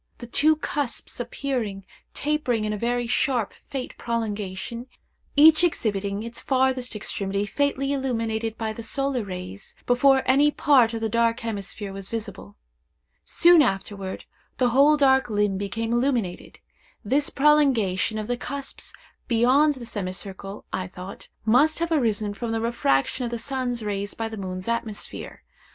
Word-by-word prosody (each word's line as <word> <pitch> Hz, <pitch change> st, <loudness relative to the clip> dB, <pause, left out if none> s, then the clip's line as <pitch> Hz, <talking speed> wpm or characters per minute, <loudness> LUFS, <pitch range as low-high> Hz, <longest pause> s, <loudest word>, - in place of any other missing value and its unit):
The 240 Hz, -, -8 dB
two 305 Hz, +6 st, +4 dB
cusps 290 Hz, -6 st, -4 dB
appeared 240 Hz, -5 st, -3 dB, 0.3 s
tapering 285 Hz, -7 st, 0 dB
in 210 Hz, -, -1 dB
a -, -, -3 dB
very 240 Hz, +1 st, 0 dB
sharp 240 Hz, -2 st, 0 dB, 0.2 s
faint 265 Hz, -2 st, -5 dB
prolongation, 225 Hz, 0 st, -3 dB, 0.5 s
each 310 Hz, +3 st, +7 dB
exhibiting 205 Hz, -, 0 dB
its 230 Hz, 0 st, -6 dB
farthest 260 Hz, -2 st, +1 dB
extremity 200 Hz, -1 st, -2 dB
faintly 280 Hz, +4 st, 0 dB
illuminated 230 Hz, -4 st, -2 dB
by 220 Hz, -1 st, -2 dB
the 230 Hz, -, -7 dB
solar 275 Hz, +1 st, -1 dB
rays, 185 Hz, 0 st, -7 dB
before 265 Hz, +2 st, +4 dB
any 280 Hz, +3 st, +5 dB
part 260 Hz, -6 st, +3 dB
of 225 Hz, -, -4 dB
the 225 Hz, -, +1 dB
dark 230 Hz, +1 st, +1 dB
hemisphere 205 Hz, -2 st, -5 dB
was 195 Hz, 0 st, -6 dB
visible. 210 Hz, -, -6 dB, 0.7 s
Soon 345 Hz, -1 st, +6 dB
afterward, 195 Hz, -4 st, -2 dB, 0.3 s
the 250 Hz, -2 st, +3 dB
whole 280 Hz, +5 st, +5 dB
dark 265 Hz, -2 st, +4 dB
limb 205 Hz, -2 st, +1 dB
became 225 Hz, +3 st, -2 dB
illuminated. 240 Hz, -7 st, -1 dB, 0.5 s
This 280 Hz, +7 st, +2 dB
prolongation 260 Hz, -9 st, +3 dB
of 215 Hz, -, -3 dB
the 245 Hz, +2 st, -2 dB
cusps 275 Hz, +2 st, -6 dB, 0.3 s
beyond 260 Hz, +6 st, +4 dB
the 250 Hz, -2 st, -8 dB
semicircle, 195 Hz, -1 st, -6 dB
I 185 Hz, 0 st, -2 dB
thought, 185 Hz, +1 st, -10 dB, 0.2 s
must 265 Hz, +8 st, +4 dB
have 335 Hz, 0 st, -2 dB
arisen 220 Hz, -8 st, +1 dB
from 225 Hz, +3 st, -4 dB
the 225 Hz, -, 0 dB
refraction 230 Hz, -, 0 dB
of -, -, -2 dB
the 235 Hz, -, -3 dB
sun's 245 Hz, -1 st, -3 dB
rays 205 Hz, -1 st, -3 dB
by 225 Hz, 0 st, -3 dB
the 220 Hz, -, -7 dB
moon's 185 Hz, -1 st, -5 dB
atmosphere. 230 Hz, -2 st, -4 dB
230 Hz, 145 wpm, -25 LUFS, 205-265 Hz, 0.7 s, each